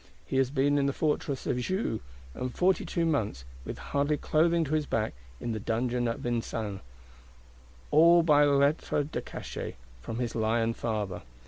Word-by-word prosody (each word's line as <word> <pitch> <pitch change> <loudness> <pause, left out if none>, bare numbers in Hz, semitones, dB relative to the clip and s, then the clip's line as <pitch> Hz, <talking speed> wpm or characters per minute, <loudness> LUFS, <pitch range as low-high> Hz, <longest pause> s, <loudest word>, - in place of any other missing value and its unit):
He 135 - -2
has 135 -1 +3
been 145 +1 +2
in 140 - +2
the 140 - 0
Fortress 145 -3 -1
of 125 - 0
Joux; 185 - -1 0.3
and 125 - -4
forty 180 +6 +2
two 170 -1 0
months, 110 - -1 0.2
with - - -6
hardly 145 +1 0
clothing 165 +3 +2
to 155 0 -3
his 155 -1 +1
back, 110 -1 0 0.3
in 120 - -3
the 110 - -2
Dungeon 120 +3 0
of 115 - -2
Vincennes;—all 115 -4 -2 1.4
by 150 -2 +5
Lettre 145 +1 +2
de 150 - -4
Cachet, - - -6 0.3
from 110 - -5
his 120 -2 -2
lion 115 +1 +1
father. 105 -6 -3
130 Hz, 160 wpm, -29 LUFS, 115-150 Hz, 1.4 s, by